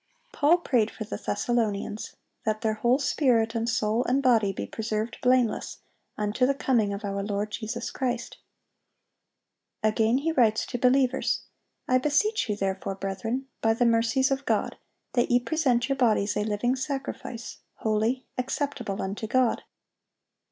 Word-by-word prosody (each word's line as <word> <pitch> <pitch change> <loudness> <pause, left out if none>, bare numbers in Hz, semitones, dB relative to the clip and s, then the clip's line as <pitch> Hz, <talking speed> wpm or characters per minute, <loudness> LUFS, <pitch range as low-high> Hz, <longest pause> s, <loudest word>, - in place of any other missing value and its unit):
Paul 310 +4 +4
prayed 245 -10 +1
for 220 - -7
the 215 - -5
Thessalonians, 210 -1 -1 0.3
that 215 0 -1
their 220 -2 +1
"whole 240 +4 +2
spirit 250 -5 +2
and 230 0 -1
soul 220 +1 +1
and 270 +3 +1
body 225 -6 +4
be - - -5
preserved 220 +1 -3
blameless 250 -3 +2 0.4
unto 210 +4 +1
the 275 - +1
coming 235 -7 +1
of 200 +1 -5
our 200 0 -2
Lord 205 +1 -2
Jesus 230 +2 -4
Christ."(812) 245 -3 -7
Again 225 +2 +2
he 315 +4 0
writes 225 -7 +3
to 245 - -4
believers, 260 +1 +2 0.4
"I 255 0 +4
beseech 300 - +1
you 210 - +1
therefore, 195 -1 -2
brethren, 195 +7 -3 0.2
by 225 0 +3
the 245 - +2
mercies 230 +3 +2
of 270 +1 -1
God, - - 0 0.4
that 240 -1 +2
ye 245 0 +5
present 245 -2 +1
your 275 -1 0
bodies 215 -5 +2
a 210 - +1
living 215 +4 0
sacrifice, 265 -3 -5 0.2
holy, 220 +4 0
acceptable 255 -6 -2
unto 200 +3 -4
God." 250 0 +2
235 Hz, 150 wpm, -27 LUFS, 215-255 Hz, 0.4 s, ye